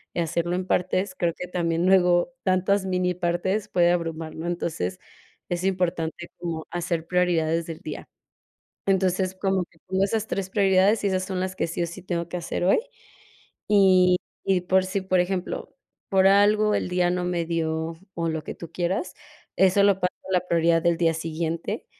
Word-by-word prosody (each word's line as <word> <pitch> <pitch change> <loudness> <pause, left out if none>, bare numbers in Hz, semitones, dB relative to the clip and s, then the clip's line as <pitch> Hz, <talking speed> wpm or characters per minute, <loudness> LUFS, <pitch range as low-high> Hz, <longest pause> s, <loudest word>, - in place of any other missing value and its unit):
hacerlo 170 +1 -1
en 185 0 -3
partes, 185 +1 0
creo 170 -2 0
que 180 - -6
también 170 -1 0
luego 180 +4 +4
tantas 190 +1 +2
minipartes 180 +2 0
puede 175 -1 +3
abrumar, 165 -2 -3
¿no? 160 - -6
Entonces, 160 - -3 0.5
es 175 0 -2
importante 175 -3 -1
como 165 -2 -4
hacer 170 -1 -2
prioridades 170 -2 +1
del 165 -2 -6
día. 155 - -7 0.8
Entonces, 190 -1 +1
como 190 -1 0
que 165 - -28
tengo 190 +1 +2
esas 215 +2 -1
3 195 -3 -3
prioridades, 195 +2 +3
y - - +3
esas 185 -1 0
son 185 -1 -3
las 185 0 -3
que - - 0
sí 170 +1 -3
o - - 0
sí 170 +2 -9
tengo 170 -2 -3
que 180 - -4
hacer 175 +1 -3
hoy. 190 - +4 0.9
Y 185 -3 +5 0.3
y 190 -2 +2
por 185 +1 +2
sí, 190 +1 -2
por 185 -1 +1
ejemplo, 180 0 -3 0.4
por 190 -1 +4
algo 210 +2 +4
el - - -2
día 180 -1 +1
no 180 0 -1
me 175 -1 -1
dio, 160 -1 -2 0.2
o 165 -1 -1
lo 160 -1 -3
que - - -6
tú 170 - -10
quieras, 180 - -2 0.4
eso 190 +1 +4
lo 200 - +5
paso 180 -1 0 0.2
a - - -3
la 180 -1 +1
prioridad 165 0 +3
del 170 -1 +2
día 165 -1 +2
siguiente, 165 +5 -3
180 Hz, 180 wpm, -25 LUFS, 170-190 Hz, 0.9 s, Y